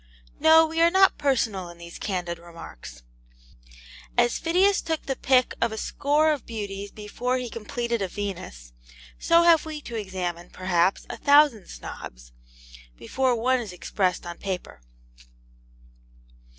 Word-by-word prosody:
No, 320 0 +7
we 325 +1 -2
are 335 - +6
not 380 +2 +4
personal 225 -10 0
in 175 - -12
these 170 0 -11
candid 175 -4 -3
remarks. 165 - -12 1.1
As 240 - +3
Phidias 370 +4 +3
took 320 -1 -3
the 270 - -2
pick 255 -1 +2
of 235 - +2
a 220 - -5
score 295 +6 +1
of 290 -5 -2
beauties 205 -3 -5
before 230 +5 -3
he 250 -2 -5
completed 235 +1 -3
a 195 - 0
Venus, 175 - -7 0.5
so 335 0 +4
have 335 -2 +5
we 310 -1 -6
to 235 - -8
examine, 180 -4 -4
perhaps, 185 0 0
a - - -7
thousand 285 -8 +4
Snobs, - - -10 0.7
before 260 - 0
one 255 +2 +2
is 220 -5 -6
expressed 180 +1 -1
upon 175 0 -7
paper. 185 - -5
220 Hz, 140 wpm, -25 LUFS, 180-285 Hz, 1.1 s, No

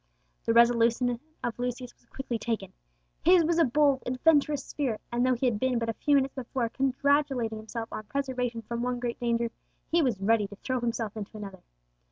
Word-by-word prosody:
The 230 - +2
resolution 235 +1 +4 0.2
of 240 0 -3
Lucius 250 0 -4
was - - -33
quickly 255 -4 -4
taken. 220 -4 -3 0.5
His 355 0 +6
was 335 +1 +1
a - - +6
bold 280 0 +3
adventurous 290 +2 +2
spirit; 255 -7 -2
and 240 +1 +1
though 255 0 +3
he 245 - -1
had 230 -4 +1
been 260 0 +1
but 230 -1 -1
a - - 0
few 290 +5 +2
minutes 270 -1 +2
before 245 -2 -2
congratulating 270 -3 +1
himself 225 +1 -5
on - - -4
preservation 250 -1 -2
from 235 +2 -4
one 250 0 -1
great 240 -1 -3
danger, 235 -1 0 0.4
he 340 +1 +4
was 250 -9 +1
ready 210 +1 +2
to 205 - -11
throw 255 +5 -2
himself 230 -3 -2
into 215 0 -7
another. 195 -3 -8
245 Hz, 195 wpm, -28 LUFS, 230-270 Hz, 0.5 s, His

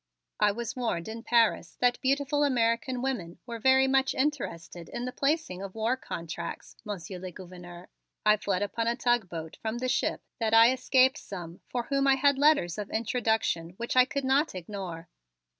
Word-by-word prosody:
"I 210 - +4
was 235 +2 -5
warned 225 -9 -2
in 225 +1 -6
Paris 230 -7 +2
that 245 -1 +2
beautiful 285 +2 +1
American 245 -1 +1
women 200 -11 -3
were 235 -1 -6
very 265 +3 +5
much 270 0 +2
interested 210 - -3
in 240 - -4
the 250 - -3
placing 275 - -1
of 195 0 -7
war 225 +3 +1
contracts, 170 -8 -6
Monsieur 190 -4 -6
le 185 +1 -6
Gouverneur. 175 0 -11 0.4
I 210 0 +6
fled 200 -1 -1
upon 230 +3 -2
a 235 - +1
tug 240 -5 +1
boat 160 -2 -7
from 220 +1 -3
the 255 +1 -2
ship 255 - 0 0.2
that 225 -1 +2
I 230 +2 +8
escape 260 +2 +3
some 175 -3 -8
for 245 -1 -2
whom 275 +2 0
I 270 - +6
had 275 0 +3
letters 285 - +3
of 205 - -5
introduction 220 -7 -1
which 235 +2 -3
I 255 0 +7
could 280 0 -3
not 270 -1 +2
ignore." 180 -2 -6
230 Hz, 180 wpm, -28 LUFS, 185-260 Hz, 0.4 s, I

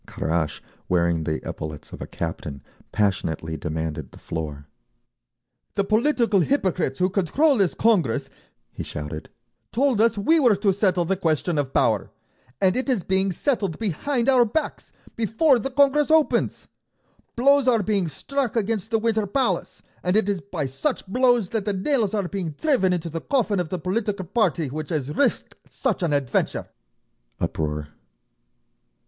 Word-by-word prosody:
Kharash, 80 -1 -2 0.3
wearing 85 -2 +1
the 80 +1 -3
epaulets 75 -1 -7
of - - -9
a - - -5
captain, 75 -4 -5 0.3
passionately 85 -6 -1
demanded 80 0 -4
the - - -14
floor. 75 -3 -5 1.1
"The 200 - +2
political 225 0 +2
hypocrites 180 - 0
who 180 - +2
control 230 - +2
this 195 -5 +2
Congress," 180 - +2 0.4
he - - -7
shouted, 75 +1 -6 0.4
"told 250 -3 +2
us 230 -1 +3
we 320 +12 +3
were 245 -7 +5
to 200 0 +2
settle 185 -3 +1
the 195 +3 +1
question 165 -2 0
of 135 -2 -2
Power—and 130 - -1
it 260 +2 -1
is 235 -9 +1
being 190 0 +1
settled 200 - -1
behind 230 - -1
our 260 -2 +6
backs, 240 +8 -3 0.2
before 235 - +3
the 270 - -3
Congress 285 +2 +3
opens! 315 -1 +2 0.7
Blows 275 +2 +4
are 230 -4 +4
being 195 -3 0
struck 260 - -3
against 220 -1 -1
the 225 - +2
Winter 220 -1 0
Palace, 200 -5 -1 0.2
and 180 +3 +1
it 215 - +2
is 200 -3 -1
by 175 -7 -4
such 135 - -2
blows 245 -1 +2
that 220 -3 -2
the 205 - 0
nails 215 +1 0
are 200 -3 -1
being 175 -5 -4
driven 260 -12 +2
into 175 -2 -1
the 165 +1 -4
coffin 220 -8 +1
of 175 -3 -2
the 185 - -2
political 195 +2 -2
party 175 - +1
which 155 +3 -5
has 150 -3 -2
risked 285 - +1 0.2
such 260 -8 -1
an 170 -3 0
adventure!" 140 -4 0 0.7
Uproar. 75 -1 -2
195 Hz, 155 wpm, -24 LUFS, 150-235 Hz, 1.1 s, our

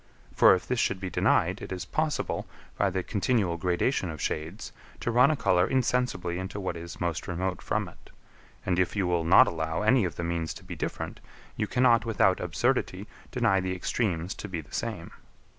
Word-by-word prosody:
For - - +7
if 90 - -6
this 125 -2 0
should 95 - +1
be 95 -1 -5
denied, - - +2
it - - -7
is 90 -2 -4
possible, 155 - -2 0.3
by 100 - +2
the 95 0 -2
continual 100 -4 0
gradation 90 +4 0
of 80 -2 -6
shades, 80 +7 -4 0.3
to 120 - -1
run 125 +4 +5
a 155 - +2
colour 90 -9 +2
insensibly 125 -9 0
into 95 +2 -5
what 95 -3 -3
is 85 +1 -8
most 85 -2 -2
remote 90 +1 -2
from - - -1
it; - - -16 0.6
and 90 -1 +1
if 90 - +1
you 100 -3 +1
will 90 -2 +1
not 85 +3 +7
allow 80 +2 -2
any 120 +2 +4
of 90 - -2
the 85 - -4
means 85 -1 -2
to - - -11
be - - -7
different, - - -4 0.4
you 105 - -1
cannot, 120 -2 +4
without 100 -5 +2
absurdity, - - 0 0.2
deny 95 - +2
the 95 0 -2
extremes 90 -2 -1
to 105 - -8
be 90 -3 -3
the 75 - -12
same. 110 -8 -4
95 Hz, 195 wpm, -28 LUFS, 85-110 Hz, 0.6 s, For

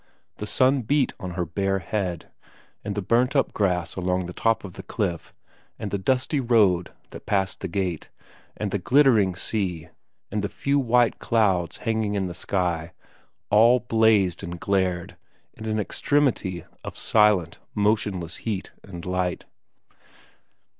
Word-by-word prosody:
The 105 - -5
sun 130 +4 +3
beat 135 +3 +1
on 90 -2 -6
her 90 -1 -1
bare 95 +4 -1
head; 90 -2 -3 0.5
and 105 - -4
the 105 - -2
burnt 125 +7 +2
up 135 - +2
grass 90 -5 0
along 90 0 -1
the 90 - -7
top 115 +3 +1
of 95 -3 -8
the - - -8
cliff, 95 -7 -3 0.5
and 100 - -5
the 100 - -1
dusty 130 +8 +1
road 105 -8 +3 0.2
that - - -11
passed 95 -2 0
the 95 - -4
gate, 90 -2 -3 0.5
and 105 -2 -3
the 100 - -1
glittering 115 -5 +4
sea, 90 -5 -3 0.4
and 105 +1 -1
the 100 - -1
few 140 +5 0
white 120 -2 +2
clouds 95 -7 +1
hanging 110 -3 -1
in 95 -1 0
the 90 - -4
sky, 90 -2 -2 0.6
all 115 +4 +6
blazed 110 -6 +2
and 85 0 -6
glared 95 -3 -1 0.4
in 110 0 -8
an 110 0 0
extremity 105 - 0 0.2
of - - -7
silent, 105 -6 +3 0.2
motionless 100 -5 0
heat 105 -5 -4
and 85 -4 -9
light. 90 -1 -2
100 Hz, 150 wpm, -25 LUFS, 90-115 Hz, 0.6 s, all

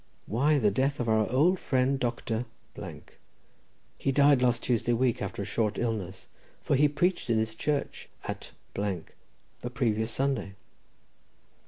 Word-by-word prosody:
Why, 145 +7 +2
the 105 -6 +3
death 135 +7 0
of 120 - -1
our 110 -2 +2
old 170 +9 +4
friend 130 +1 +1
Dr. 120 -1 -1 0.7
—. - - -35
He 135 - +1
died 140 -1 +5
last 120 -1 +2
Tuesday 120 -1 +1
week, 120 0 +1
after 100 0 -3
a - - -5
short 105 +1 0
illness, 100 -6 -3 0.4
for - - +2
he 145 +3 +5
preached 175 +1 0
in 115 - +3
his 110 0 0
church 145 +5 -2
at - - -5 0.2
the 100 +4 -6
previous 110 -3 0
Sunday." 120 -6 -1
120 Hz, 145 wpm, -29 LUFS, 110-135 Hz, 0.7 s, died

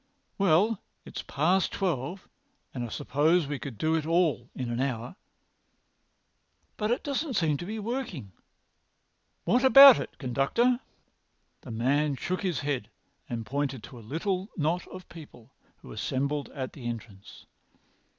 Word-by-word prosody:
"Well, 195 +4 +3 0.2
it's - - -6
past 175 +6 +1
twelve, 175 -1 -2 0.5
but 125 - -4
I 120 - -2
suppose 150 +8 +1
we 140 -1 -4
could 130 -6 -7
do 155 +8 +1
it 160 -1 +1
all 160 -8 +1
in 125 -2 -3
an 120 - -2
hour. 125 0 -2 1.6
But 210 0 -2
it 240 - 0
doesn't 285 -1 -2
seem 160 -6 +2
to 175 - -7
be 220 +2 -4
working. 215 - -4 1.1
What 250 +2 +2
about 275 0 +10
it, - - -7
conductor?" 140 - +1 0.8
The - - -11
man 140 +6 +1
shook 180 +8 -3
his 180 -9 -1
head 140 -7 -2 0.4
and 115 -2 -4
pointed 135 -1 -2
to 125 - -11
a - - -11
little 185 +5 -2
knot 165 +3 0
of 185 0 -10
people 145 -8 -13 0.3
who - - -12
were - - -8
assembled 140 - -2
at 130 -2 -6
the 125 -5 -7
entrance. 110 -4 -8
150 Hz, 150 wpm, -28 LUFS, 130-185 Hz, 1.6 s, about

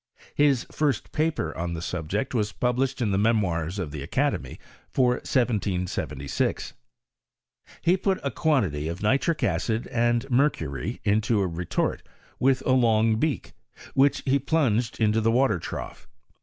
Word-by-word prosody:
His 145 -4 +3
first 150 -3 -1
paper 150 - -1
on 85 0 -3
the 80 - -5
subject 95 - -3
was 105 -4 0
published, 125 +1 0
in 105 - 0
the 95 - +1
Memoirs 95 -6 +1
of 90 -7 -3
the 75 -1 -6
Academy, 85 - -1 0.3
for 125 -2 +2
1 - - -13
776, 95 - -1 1.1
He 180 +3 +4
put 190 0 0
a 140 - -1
quantity 100 - 0
of 85 +4 -5
nitric 140 +9 +1
acid 105 +6 0
and 120 +1 +1
mercury 80 - 0
into 110 +2 +2
a - - +1
retort 85 0 -2 0.4
with 130 0 +2
a - - +2
long 115 -3 +3
beak, 145 -1 -2 0.4
which 140 +1 +3
he 140 +1 +3
plunged 125 -6 0
into 110 0 +2
the 110 - +2
water 125 -5 +2
trough. - - -7
115 Hz, 145 wpm, -26 LUFS, 90-135 Hz, 1.1 s, He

